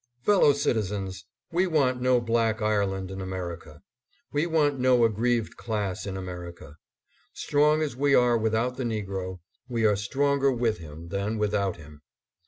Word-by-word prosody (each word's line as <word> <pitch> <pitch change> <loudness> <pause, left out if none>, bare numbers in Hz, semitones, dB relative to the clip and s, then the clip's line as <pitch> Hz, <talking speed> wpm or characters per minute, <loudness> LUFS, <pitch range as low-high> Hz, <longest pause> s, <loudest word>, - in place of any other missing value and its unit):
Fellow 200 -8 +5
citizens! 100 - -2 0.3
We 180 +3 +2
want 135 -7 +1
no 125 0 +3
black 115 -1 +1
Ireland 100 -3 0
in 95 0 -6
Amer 95 -2 -4
ica. 80 -2 -16 0.5
We 150 +3 0
want 150 -4 +1
no 125 -2 +4
aggrieved 115 +1 0
class 105 -4 -3
in 95 -1 -4
America. 85 -4 -8 0.6
Strong 150 +2 +2
as 145 -6 -3
we 140 +1 +3
are 125 -1 +4
without 115 +3 0
the 130 - -2
negro, 95 -5 -4 0.3
we 115 -2 0
are 105 -1 +4
stronger 140 +6 +1
with 115 -3 0
him 80 +1 -10
than 100 +3 -2
without 100 -2 0
him. 75 -2 -14
110 Hz, 155 wpm, -26 LUFS, 95-130 Hz, 0.6 s, Fellow